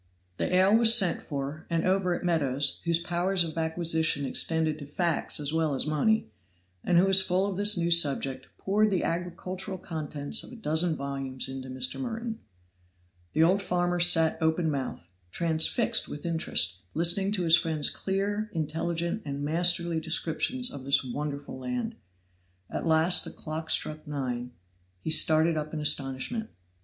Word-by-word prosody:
The - - -2
ale 190 +3 +4
was 230 0 +5
sent 180 -4 +3
for, 140 +1 -6
and 165 -1 -1
over 185 -1 +1
it - - -7
Meadows, 145 -5 0
whose 170 -1 +2
powers 175 +2 0
of 160 -2 -6
acquisition 160 -2 0
extended 160 +2 0
to 145 - -9
facts 170 +1 0
as 145 0 -3
well 160 -3 0
as - - -2
money, 155 - 0 0.5
and 175 - +2
who 180 - +5
was 195 0 +5
full 190 +1 0
of 200 -2 -3
this 205 +1 +5
new 170 0 0
subject, 140 -5 +2
poured 210 +2 +1
the 190 -3 -1
agricultural 180 +2 -4
contents 155 +1 -3
of - - -12
a - - -10
dozen 165 -5 0
volumes 135 -2 -3
into 130 0 -7
Mr. 130 0 -1
Merton. 230 -3 -5 0.9
The 160 - +3
old 185 +4 +3
farmer 175 -1 -1
sat 165 -2 +5
open 160 0 +1
mouthed, 135 - -4 0.3
transfixed 170 - +1
with 150 - -8
interest, 160 - 0 0.2
listening 175 +5 +2
to 185 -4 -1
his 165 -1 +6
friend's 160 -4 +1
clear, 205 +2 -3
intelligent 165 +4 -3
and 140 0 -5
masterly 170 +1 +1
descriptions 165 +10 -1
of 140 - -9
this 140 +1 +2
wonderful 140 +1 -6
land. 240 - -4 0.8
At - - -3
last 160 +2 +4
the - - -5
clock 160 +1 -7
struck 155 +1 -1
nine; 125 -4 -4 0.5
he 160 - -4
started 160 +1 +5
up 155 +1 -4
in - - -3
astonishment. 145 - -1
165 Hz, 160 wpm, -27 LUFS, 150-185 Hz, 0.9 s, his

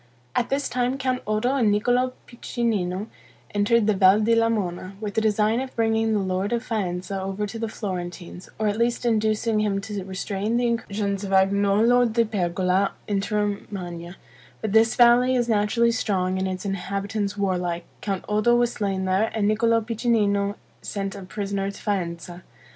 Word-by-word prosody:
At 240 - +1
this 275 +1 0
time 250 +1 -1
Count 255 -1 -1
Oddo 215 +5 +1
and 230 -6 +3
Niccolo 245 +5 +1
Piccinino 215 -6 -2 0.5
entered 210 +2 +3
the 215 - +3
Val 190 +1 +5
di 220 +2 +2
Lamona, 205 -5 0
with 210 -2 -4
the 220 - +1
design 215 +2 +2
of 265 -1 -7
bringing 225 -1 +1
the - - +2
lord 190 +2 -1
of 235 0 0
Faenza 190 -3 -3
over 195 +2 -3
to 225 +2 -7
the 225 - -2
Florentines, 180 -3 -6
or 215 - 0
at 205 +1 -1
least 240 +1 0
inducing 220 -1 +1
him 205 -2 0
to 205 -1 -5
restrain 195 +4 -2
the 245 - +1
incursions 205 -4 -1
of 200 - -4
Agnolo 200 +5 +4
della 230 0 +2
Pergola 185 -1 0
into 205 +1 -1
Romagna; 190 -4 -4 0.4
but 220 - -3
as - - -4
this 225 +1 +4
valley 245 +1 +5
is 240 -1 +1
naturally 225 +2 +2
strong, 190 -4 0
and 190 - 0
its 185 +1 -4
inhabitants 200 +2 -3
warlike, 180 -3 -1 0.2
Count 195 -3 -3
Oddo 215 +3 +3
was 240 0 +2
slain 195 -2 -2
there, 190 +4 +2
and 210 -2 +1
Niccolo 230 +2 +3
Piccinino 210 -3 +1 0.3
sent 195 -1 -4
a 200 - -8
prisoner 195 +1 -3
to 200 - -9
Faenza. 175 -3 -3
210 Hz, 170 wpm, -24 LUFS, 195-230 Hz, 0.5 s, Val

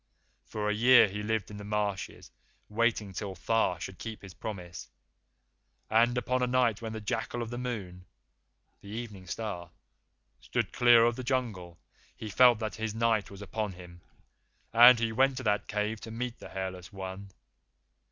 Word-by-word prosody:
For 105 -1 -3
a 105 - +2
year 125 +2 +7
he 105 +1 -5
lived 105 -2 -2
in 105 - -8
the 105 - -8
marshes 105 -2 -3 0.4
waiting 110 -2 0
till 95 0 -5
Tha 100 -1 +1
should 90 +1 -7
keep 110 -2 -7
his 95 -2 -10
promise. 90 -5 -7 1.0
And 120 +2 +4
upon 125 +1 0
a 125 - +2
night 125 -4 +2
when 115 -1 -5
the 110 - -4
jackal 115 +3 -3
of 115 - -7
the 120 - -4
Moon 95 -8 -5 0.8
[the 100 - -12
Evening 105 -4 -7
Star] 90 -2 -5 0.7
stood - - -2
clear 120 -1 +6
of 120 +1 +1
the 130 - -5
Jungle, 110 -10 -2 0.4
he 110 - -6
felt 125 +2 +6
that 110 -1 -4
his 110 -1 -3
Night 115 -2 +1
was 100 0 -10
upon 105 0 -3
him, 90 -1 -13 0.7
and 120 +2 +9
he 115 -1 0
went 130 +3 +2
to 130 - -4
that 105 -2 0
cave 105 +1 -2
to 115 - -8
meet 120 +2 -5
the - - -10
Hairless 95 -1 -6
One. 95 0 -7
110 Hz, 170 wpm, -30 LUFS, 100-120 Hz, 1.0 s, and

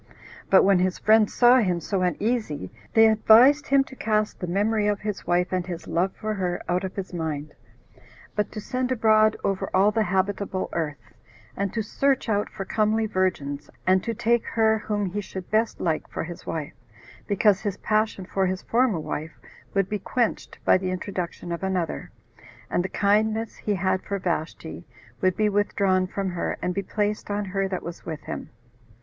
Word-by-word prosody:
But 190 - +7
when 195 -1 +4
his 185 0 +1
friends 215 0 +4
saw 245 +1 +6
him 180 -6 +1
so 190 +3 -2
uneasy, 180 - -1 0.2
they 225 0 +8
advised 235 +7 +6
him 275 0 +4
to 265 - -13
cast 215 -3 0
the 180 - -4
memory 210 +4 +1
of 205 -1 0
his 210 -2 -4
wife, 180 +1 +1
and 180 -1 -1
his 175 -2 -6
love 185 +3 +1
for 215 -1 -3
her, 180 -3 -2
out 180 +1 0
of 190 - -5
his 190 -2 -5
mind, 155 -3 -4 0.8
but 210 - -1
to - - -6
send 255 +4 -2
abroad 215 -2 +4
over 195 -1 -1
all 195 +3 +5
the 220 - +1
habitable 190 +1 -1
earth, 150 -4 -4 0.4
and 200 -1 -2
to 225 - 0
search 270 +4 0
out 205 -1 +1
for 195 -2 -6
comely 220 +2 +1
virgins, 150 -8 -1 0.2
and 185 0 +3
to 230 -1 -3
take 235 +2 +2
her 220 -1 +2
whom 210 -1 -2
he 200 +3 -3
should 190 -2 -8
best 220 +1 +1
like 160 -3 -1
for - - -4
his 170 +1 -9
wife, 155 -3 -4 0.5
because 205 -1 +3
his 205 -2 -3
passion 215 -3 0
for 190 +1 0
his 185 0 -3
former 235 -6 +2
wife 155 0 -5 0.4
would 195 -2 +2
be 210 0 -2
quenched 235 +4 -2
by - - +5
the 185 0 -2
introduction 180 -2 -4
of 170 - -3
another, 185 -4 -2 0.6
and 175 - +1
the 190 - -3
kindness 215 +2 +1
he 210 - -1
had 185 0 0
for 200 - -3
Vashti 165 -2 -4 0.4
would 185 -1 +2
be 215 - +3
withdrawn 200 -2 +1
from 195 +1 -3
her, 175 - -2
and 180 - -2
be 200 - -1
placed 210 +2 -2
on 205 0 -1
her 195 0 -1
that 190 -1 -4
was 170 0 -7
with 160 -2 -6
him. - - -6
195 Hz, 190 wpm, -25 LUFS, 180-215 Hz, 0.8 s, they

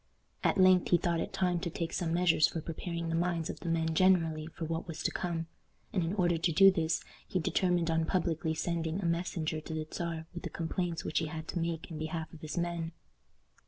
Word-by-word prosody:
At - - +3
length 185 -1 +6
he 175 - +6
thought 170 -1 0
it - - -3
time 180 -2 +1
to 175 0 -3
take 165 0 -3
some 170 -2 -1
measures 170 -3 +4
for 165 - -4
preparing 170 +1 -4
the 165 - 0
minds 170 -1 0
of - - -11
the 170 - -4
men 160 -1 +1
generally 165 -3 +3
for 165 0 -6
what 165 +2 -3
was 165 -2 -5
to - - +1
come, 170 -2 -2 0.5
and 185 - +1
in 170 +4 -1
order 175 -4 +2
to 170 +1 +2
do 195 +4 +8
this 165 -3 0 0.2
he - - -1
determined 175 -1 +1
on 160 0 +2
publicly 165 -3 0
sending 165 +1 -1
a 195 - -3
messenger 170 -2 -1
to 160 - -6
the 155 0 -2
Czar 165 -2 -3
with 175 - -6
the - - -4
complaints 170 -1 -2
which - - +1
he 160 - -2
had 160 0 -6
to 175 - -2
make 165 0 -3
in 155 - -5
behalf 160 +1 -4
of 160 - -11
his 155 +3 -5
men. 170 -1 -2
165 Hz, 230 wpm, -32 LUFS, 160-175 Hz, 0.5 s, do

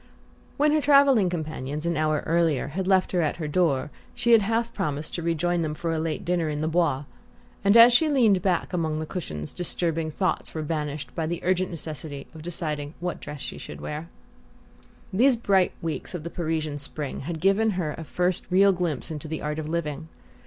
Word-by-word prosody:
When 300 +1 +4
her 305 0 +3
travelling 275 -9 +5
companions, 155 -3 -4
an 170 0 0
hour 155 -1 +1
earlier, 165 -4 +1
had 185 +5 -3
left 190 -1 +3
her 180 - +2
at 155 - 0
her 160 -3 -4
door, 150 -4 +1 0.2
she 235 - +1
had 230 -2 +8
half 225 +3 0
promised 155 -6 -3
to 170 - -2
rejoin 170 +1 0
them 155 -2 -2
for 165 +1 -2
a 160 - -1
late 160 -1 -3
dinner 175 -3 0
in 150 0 -3
the 155 - 0
Bois; 165 -4 +1 0.6
and 200 +3 +6
as 235 +1 +9
she 310 +6 +4
leaned 225 -10 +4
back 185 0 0
among 160 -3 -1
the 155 - -3
cushions 75 - -5
disturbing 165 -2 0
thoughts 185 +3 -2
were 155 - -2
banished 150 -1 -3
by 160 -2 -2
the 170 +1 -2
urgent 185 0 +1
necessity 155 -4 -6
of 160 - -10
deciding 155 -3 -4
what 180 0 -3
dress 150 -2 -7
she - - -6
should - - -9
wear. 155 +3 -6 1.0
These 245 +5 +4
bright 195 -5 +2
weeks 165 +2 -3
of 165 - -5
the 170 - -6
Parisian 155 -3 -2
spring 145 0 -4
had 160 +3 -5
given 195 +5 +3
her 155 -5 -1
a 165 - -7
first 180 +3 -1
real 195 +2 +5
glimpse 170 -6 -2
into 155 0 -6
the 160 0 -4
art 150 +1 -2
of 155 -1 -4
living. 160 -2 -3
165 Hz, 200 wpm, -26 LUFS, 155-185 Hz, 1.0 s, as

